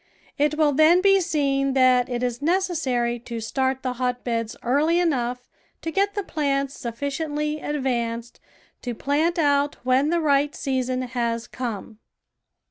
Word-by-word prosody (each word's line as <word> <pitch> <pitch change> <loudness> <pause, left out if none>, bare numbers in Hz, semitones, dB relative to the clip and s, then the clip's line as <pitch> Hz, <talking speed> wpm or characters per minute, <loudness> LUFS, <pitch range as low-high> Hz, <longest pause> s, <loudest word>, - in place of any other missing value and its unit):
It 300 +1 +2
will 305 -2 +4
then 315 +5 +6
be 390 +1 +5
seen 275 -5 0
that 255 -1 +4
it 245 0 -2
is 245 0 -2
necessary 295 -9 0
to 235 0 -6
start 260 +4 -1
the 255 -1 -1
hot 250 0 -1
beds 230 -2 -2
early 300 +7 +2
enough 250 -7 -1 0.4
to 325 - -2
get 400 +5 +1
the 405 - -1
plants 275 -4 -1
sufficiently 295 +5 -3
advanced 240 -5 -2 0.4
to 245 -2 -4
plant 310 +8 0
out 285 -2 +2
when 260 +3 +3
the 340 +1 +2
right 290 -2 +2
season 255 -1 -1
has 235 -2 -2
come. 225 -3 -6
275 Hz, 145 wpm, -24 LUFS, 245-305 Hz, 0.4 s, then